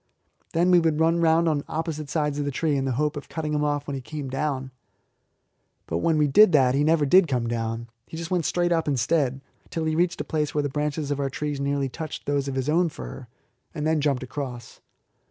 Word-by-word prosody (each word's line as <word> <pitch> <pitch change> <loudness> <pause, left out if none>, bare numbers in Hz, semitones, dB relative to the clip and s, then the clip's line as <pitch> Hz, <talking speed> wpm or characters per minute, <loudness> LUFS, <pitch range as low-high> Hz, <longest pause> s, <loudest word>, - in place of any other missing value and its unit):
Then 175 +2 +3
we 180 - +7
would 160 -2 +1
run 165 +1 +3
round 165 +1 +4
on 150 -3 +1
opposite 155 -2 -4
sides 150 -1 -1
of 145 - -1
the - - 0
tree 150 +2 0
in 135 -1 0
the 130 - 0
hope 150 +4 0
of 145 - -7
cutting 155 -2 -3
him 150 0 +1
off 145 -1 0
when 140 - -3
he 135 - -4
came 145 +1 -6
down. 135 -1 -2 1.1
But 85 - -2
when 160 - +2
we 150 - +4
did 185 +6 +6
that 130 -4 +5
he 140 +2 +2
never 155 -1 +3
did 180 +5 +5
come 125 -4 -1
down, 115 0 -3 0.2
but 160 - -7
just 165 +1 -6
went 175 0 +1
up 165 -2 +1
instead, 135 0 +1 0.3
till 165 - -3
he 155 0 0
reached 175 +1 +1
a - - -1
place 150 -2 -2
where 150 - +2
the 145 - -1
branches 150 +1 -2
of 145 - -1
our 140 -1 0
trees 145 +1 -3
nearly 140 0 0
touched 155 +4 -7
those 140 -1 0
of 135 - -3
his 130 0 -2
own 170 +3 +3
fir, 135 -4 -9 0.5
and 150 -1 -3
then 160 -1 +2
jumped 140 -3 0
across. 125 -3 -7
150 Hz, 230 wpm, -25 LUFS, 135-160 Hz, 1.1 s, we